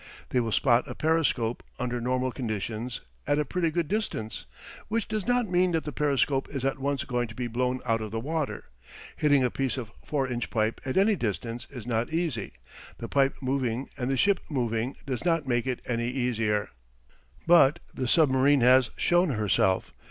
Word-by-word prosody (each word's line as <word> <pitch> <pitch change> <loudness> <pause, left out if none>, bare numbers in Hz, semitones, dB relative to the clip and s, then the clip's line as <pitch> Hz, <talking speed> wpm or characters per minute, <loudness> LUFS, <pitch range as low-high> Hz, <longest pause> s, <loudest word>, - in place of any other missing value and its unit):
They 125 - +2
will 115 -2 -1
spot 120 +1 +3
a - - -6
periscope, 155 -8 +1 0.2
under 125 -1 -2
normal 130 +1 0
conditions, 115 0 -4 0.3
at 145 - +2
a 150 - +1
pretty 170 +3 0
good 165 0 -1
distance; 170 - -3 0.4
which 225 0 -1
does 215 -1 -3
not 245 -2 +2
mean 180 -1 +2
that 160 - +1
that 150 - -4
periscope 140 -1 +1
is 135 -2 -4
at 135 0 0
once 140 0 -1
going 120 -2 -1
to 110 - -11
be 125 - -3
blown 125 +2 -1
out 115 -2 +1
of 110 - -4
the 115 +2 -3
water. 155 +4 -3 0.5
Hitting 145 -3 +3
a 125 - +1
piece 135 -2 -1
of 115 -4 -5
4 140 -3 -1
inch 120 -1 -3
pipe 110 0 0
at 130 - -2
any 205 +2 +4
distance 115 - -3
is 125 -6 -8
not 115 -1 -1
easy; 160 - -2 0.4
the - - -6
pipe 140 -1 +2
moving 130 -2 -1
and 125 -2 -3
the 135 - +1
ship 200 +9 +3
moving 120 -3 -1
does 130 -3 -3
not 165 -4 +1
make 120 0 0
it 125 -2 -2
any 120 -1 -1
easier. 115 -5 0 0.8
But 170 -3 +6 0.2
the 130 - -2
submarine 140 -1 +4
has 125 0 +6
shown 175 0 +3
herself. 105 -5 +1
130 Hz, 190 wpm, -27 LUFS, 120-150 Hz, 0.8 s, But